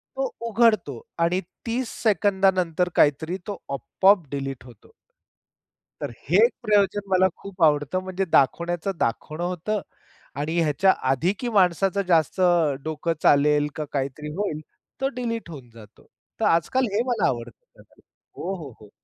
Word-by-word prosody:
तो 270 -1 -2 0.2
उघडतो 215 - +2 0.2
आणि 175 +3 +2 0.3
30 240 +1 -2
सेकंदानंतर 190 -4 +2
काहीतरी 160 +5 +2
तो 205 - -4 0.2
आपोआप 185 - +2
डिलीट 135 -4 -4
होतो. 120 -5 -17 1.1
तर - - -3 0.2
हे 175 +5 +3
एक 245 - +1
प्रयोजन 205 -2 +1
मला 185 0 +4
खूप 190 -3 -5
आवडतं. 150 +3 +2
म्हणजे 190 +1 -2
दाखवण्याचं 170 +6 +2
दाखवणं 155 +8 -2
होतं 180 +4 -2 0.6
आणि 160 +3 -2
ह्याच्या 165 +5 +3 0.2
आधी 170 +9 +1
की 245 - -2
माणसाचं 190 +2 +2
जास्त 165 +1 +2 0.4
डोकं 160 +2 -2
चालेल 145 +1 +4
का 155 - -3
काहीतरी 140 +2 -3
होईल, 185 -7 -2 0.4
तो 270 - +2
डिलीट 230 -6 -4
होऊन 135 -7 -10
जातो. 110 -2 -16 0.3
तर - - +1
आज-काल 170 +11 +2
हे 215 - +2
मला 235 -5 +1
आवडतं, 125 - -6 0.5
हो, 190 - -4
हो, 150 -7 -8
हो. 105 - -14
175 Hz, 140 wpm, -24 LUFS, 150-200 Hz, 1.1 s, मला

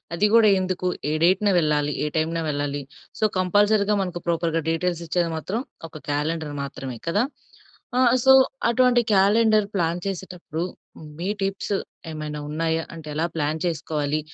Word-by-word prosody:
అది 205 +5 +3
కూడా 225 -2 +7
ఎందుకు 185 -1 -2 0.2
ఏ - - 0
డేట్‌న 190 +4 +4
వెళ్ళా? 150 -2 +2 0.3
ఏ - - 0
టైమ్‌నా 165 +1 0
వెళ్ళాలి? 145 -1 -2 0.4
సో, 220 - -2 0.2
కంపల్సరీ 205 +3 +3 0.2
మనకు 175 -2 -5
ప్రాపర్‌గా 165 -1 0
డీటెయిల్స్ 170 +1 -1
ఇచ్చేది 170 0 0
మాత్రం 195 +9 -3 0.3
ఒక 160 - -10
క్యాలెండర్ 150 +1 -2
మాత్రమే 135 -3 -6
కదా? 205 +7 +2 0.7
అ! - - +4 0.3
సో, 265 - +8 0.4
అటువంటి 250 0 +4
క్యాలెండర్ 215 +2 +4
ప్లాన్ 170 0 0
చేసేటప్పుడు 180 -3 -5 0.6
మీ 175 - -3
టిప్స్ 195 +1 -1 0.4
ఏమైనా 150 -1 -5
ఉన్నాయా? 160 +1 -1
అంటే 160 -2 -10
ఎలా 155 +3 0
ప్లాన్ 155 0 -1
చేసుకోవాలి? 155 -3 -1
170 Hz, 140 wpm, -24 LUFS, 155-195 Hz, 0.7 s, సో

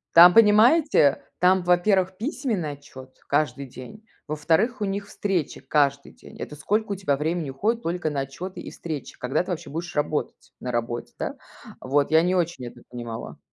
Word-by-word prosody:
Там, 175 +1 +10
понимаете, 225 - +5 0.2
там, 180 0 +4
во-первых, 185 +1 +2
письменный 220 - -2
отчет 130 -2 -13
каждый 140 -2 0
день, 135 - -12 0.2
во-вторых, 165 - +1
у - - 0
них 200 +1 -3
встреча 190 -7 -2
каждый 140 -1 +1
день. - - -15
Это 150 - -6
сколько 205 +8 -1
у - - 0
тебя 160 -8 0
времени 160 0 -2
уходит 225 - -1
только 170 -2 -2
на 140 -2 -2
отчёты 165 +8 -6
и - - -8
встречи? 155 -6 -7
Когда 125 +7 0
ты 180 - -8
вообще 170 - -4
будешь 170 +3 -5
работать 150 +1 -2
на 125 - -4
работе, 120 0 -3
да? - - -3 0.5
Вот, 140 +3 +1
я 160 +1 +6
не 180 +1 +1
очень 165 -7 -1
это 120 0 -11
понимала. 120 -2 -7
165 Hz, 175 wpm, -24 LUFS, 140-195 Hz, 0.5 s, Там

